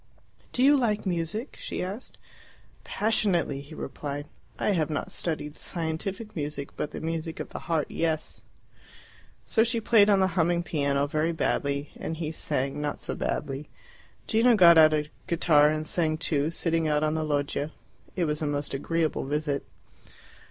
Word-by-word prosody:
"Do 250 - +1
you 285 +2 +7
like 215 -5 0
music?" 185 - -2
she - - -4
asked. 200 +7 -7 0.7
"Passionately," 195 -9 0
he 145 +3 -11
replied. 145 -1 -5 0.3
"I - - +1
have 165 -6 +1
not 150 - -3
studied 155 -3 -3
scientific 185 +8 -4
music, 145 -2 -4
but 150 - -3
the - - -7
music 165 0 -4
of - - -5
the - - -6
heart, 160 -3 +2
yes." 160 -2 -2 1.0
So 225 - +3
she 230 0 +1
played 215 -2 +5
on 200 -2 +5
the 190 - +4
humming 175 0 +2
piano 140 -4 0
very 155 +3 0
badly, 140 -2 -1
and 160 - -5
he 155 -1 -3
sang, 140 -3 -2
not 145 -1 -2
so - - -4
badly. 140 +2 -3 0.6
Gino 230 +2 +4
got 170 -4 +8
out 155 -1 +8
a 150 -1 0 0.2
guitar 155 -3 +4
and 155 0 -1
sang 155 -1 0
too, 155 -2 +1
sitting 165 -1 0
out 150 0 +2
on 155 0 +1
the 160 0 -1
loggia. 145 0 -1 0.4
It 175 - +1
was 150 0 -2
a 155 - 0
most 145 -1 -2
agreeable 160 +3 -1
visit. 145 0 -2
160 Hz, 165 wpm, -27 LUFS, 150-175 Hz, 1.0 s, got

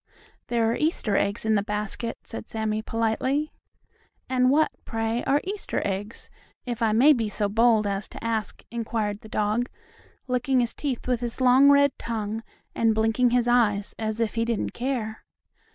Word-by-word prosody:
"There 235 -1 +1
are - - 0
Easter 300 - 0
eggs 200 +2 0
in 220 - +3
the 205 - +3
basket," 210 +3 -3
said 225 - -8
Sammie 220 -1 -2
politely. 245 +7 -1 0.7
"And 255 -1 +3
what, 305 +3 +3
pray, 225 +1 -2
are 285 +2 +2
Easter 400 +2 -3
eggs, 205 +3 -4 0.3
if 240 -2 -4
I 225 -1 +3
may 260 +8 +6
be 225 -5 -1
so 205 0 -1
bold 225 +1 +3
as 200 +1 -2
to - - -10
ask?" 225 -2 -2
inquired 220 -3 -2
the 220 - -12
dog, 215 +4 0 0.6
licking 255 +1 +1
his 240 -1 0
teeth 270 -5 -4
with 250 -2 +1
his 240 0 -4
long 260 +2 +6
red 285 0 +5
tongue, 220 -1 -3 0.3
and 225 -1 +2
blinking 225 +3 +2
his 245 0 +2
eyes, 210 -5 +2
as 220 0 -2
if 230 -2 0
he 230 - 0
didn't 230 -2 -2
care. 240 -4 -3
230 Hz, 170 wpm, -25 LUFS, 215-250 Hz, 0.7 s, may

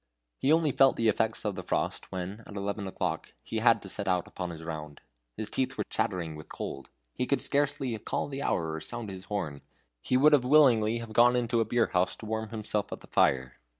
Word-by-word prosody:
He 140 - +2
only 160 -2 +4
felt 135 0 +5
the 115 -1 +2
effects 110 +1 0
of 105 - 0
the 95 - -5
frost - - -2
when, 95 +4 -5
at 100 - -10
eleven 100 0 -3
o'clock, 95 - -3
he - - -4
had - - +4
to - - -8
set 100 -1 -4
out 90 -2 +1
upon 90 -2 -5
his 80 -1 -8
round. 75 -3 -6 0.4
His 110 - -4
teeth 130 - -1
chattered 85 -4 -1
with 75 - -11
cold; 70 - -6 0.2
he 125 - -2
could 140 - +2
scarcely 140 -4 0
call - - -2
the 140 -1 -5
hour 80 - 0
or 80 - -4
sound 120 -4 -6
his 95 -1 -8
horn. 80 -9 -3 0.4
He 125 - +2
would 150 +3 +6
willingly 125 -6 +5
have 115 -1 -7
gone 120 +2 +6
into 120 -1 +1
a 115 - +2
beer 115 +1 +1
house 90 0 +2
to - - -10
warm 110 0 -3
himself 105 -2 -2
at - - -6
the - - -12
fire. 65 -1 +2
110 Hz, 215 wpm, -29 LUFS, 90-120 Hz, 0.4 s, would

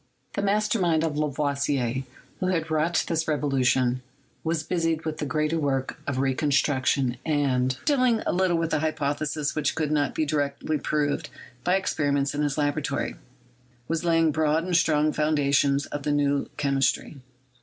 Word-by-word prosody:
The 200 - -1
master 210 +2 +1
mind 165 -3 +2
of 160 -2 -1
Lavoisier, 140 -4 0 0.4
who 185 - -1
had 165 -3 -1
wrought 160 +2 +1
this 165 -1 -1
revolution, 130 -4 +1 0.4
was 160 -1 -1
busied 165 -1 -1
with 155 -1 -3
the 150 - -2
greater 155 +2 0
work 135 -3 -1
of 140 -2 -1
reconstruction 135 -1 +1
and, 130 -4 +1
dealing 255 -6 +3
little 180 -1 +2
with 165 -1 -1
hypotheses 150 -1 -1
which 150 -3 0
could 155 -2 -1
not 145 -2 +1
be 155 - +1
directly 145 +1 -1
proved 145 0 -1 0.3
by 180 - +3
experiments 145 -7 0
in 145 - -1
his 145 -1 0
laboratory, 145 -1 -1 0.7
was 165 0 -1
laying 165 -2 +3
broad 155 +1 +1
and 180 0 -1
strong 155 -3 +3
the - - -3
foundations 140 -2 +2
of 145 - -5
the 150 - -1
New 145 -1 +1
Chemistry. 140 +1 0
150 Hz, 155 wpm, -26 LUFS, 140-160 Hz, 0.7 s, dealing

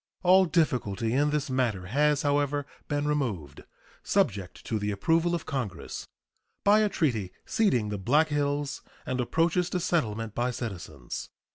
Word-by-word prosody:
All 185 +1 +6
difficulty 120 - 0
in 145 +3 +3
this 145 -2 -1
matter 120 -8 0
has, 145 +7 +2
however, 145 0 +1 0.2
been 145 -1 -1
removed 105 - -2 0.4
subject 95 -2 -1
to 110 - -1
the 105 0 -2
approval 165 - +2
of 170 - -5
Congress 130 - -4 0.6
by 205 +1 +6
a 215 -1 +3
treaty 115 - 0
ceding 125 - +2
the 105 -1 -3
Black 150 +11 +3
Hills 145 -1 -1 0.2
and 130 0 -1
approaches 165 +7 +1
to 180 - -1
settlement 115 - -1
by 120 +2 0
citizens. 90 - -6
140 Hz, 145 wpm, -28 LUFS, 105-155 Hz, 0.6 s, All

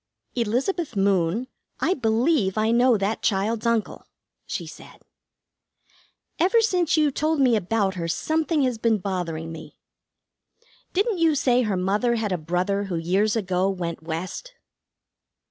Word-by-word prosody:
"Elizabeth 250 - -1
Moon, 195 +3 +1 0.3
I 370 - +2
believe 225 - +1
I 220 +1 +2
know 240 0 +4
that 200 +2 -2
child's 215 +3 0
uncle," 230 -2 -1 0.4
she - - -4
said. - - -13 1.4
"Ever 385 +7 +4
since 360 -8 +2
you 300 -2 +3
told 310 +3 0
me 255 -4 +4
about 205 0 0
her 170 -3 -4
something 315 - 0
has 250 -4 -1
been 225 -1 +2
bothering 175 -4 -4
me. 160 - -10 1.2
Didn't 400 0 0
you 325 -2 +3
say 250 -3 +3
her 210 -5 0
mother 205 +6 +1
had 220 -3 -2
a 180 - 0
brother 180 +5 -1
who 190 -3 -4
years 190 +6 +1
ago 190 -3 0
went 175 -4 -4
West?" 175 - -6
220 Hz, 140 wpm, -24 LUFS, 185-265 Hz, 1.4 s, know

